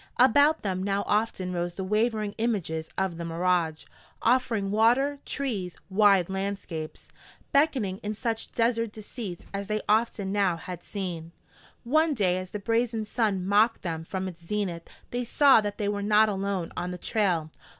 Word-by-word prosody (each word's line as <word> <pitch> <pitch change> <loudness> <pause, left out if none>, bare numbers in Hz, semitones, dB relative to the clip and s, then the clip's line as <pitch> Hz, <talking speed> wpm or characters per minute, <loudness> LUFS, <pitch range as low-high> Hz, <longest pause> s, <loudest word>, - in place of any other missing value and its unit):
About 285 +5 +5
them 185 -2 -1
now 200 +1 0
often 205 -4 0
rose 175 0 -2
the 190 - -4
wavering 215 +1 0
images 175 -9 -1
of 190 -3 -1
the 170 - -5
mirage, 165 -1 0 0.4
offering 225 -5 +2
water, 245 +7 +3
trees, 205 -11 -3
wide 195 -3 +5
landscapes; 190 -5 -5 0.4
beckoning 260 -10 +2
in 210 +1 -3
such 225 0 -3
desert 230 -2 0
deceits 210 -4 -7
as 200 0 -3
they 215 0 -1
often 210 -2 +1
now 195 -4 +2
had 175 +1 -8
seen. 170 -5 -5 0.5
One 310 +4 +2
day 185 -5 +2
as 185 0 -7
the 210 - -4
brazen 230 +1 0
sun 210 -4 0
mocked 210 +4 +3
them 165 -3 -3
from 190 +3 -4
its 170 -2 -9
zenith 175 -3 -3 0.2
they 245 0 -1
saw 270 0 +5
that 205 -1 -4
they 205 - -1
were 205 0 -1
not 210 +1 +4
alone 195 -3 -2
on 180 0 -3
the 180 - -5
trail. 180 -6 0
200 Hz, 160 wpm, -27 LUFS, 180-225 Hz, 0.5 s, About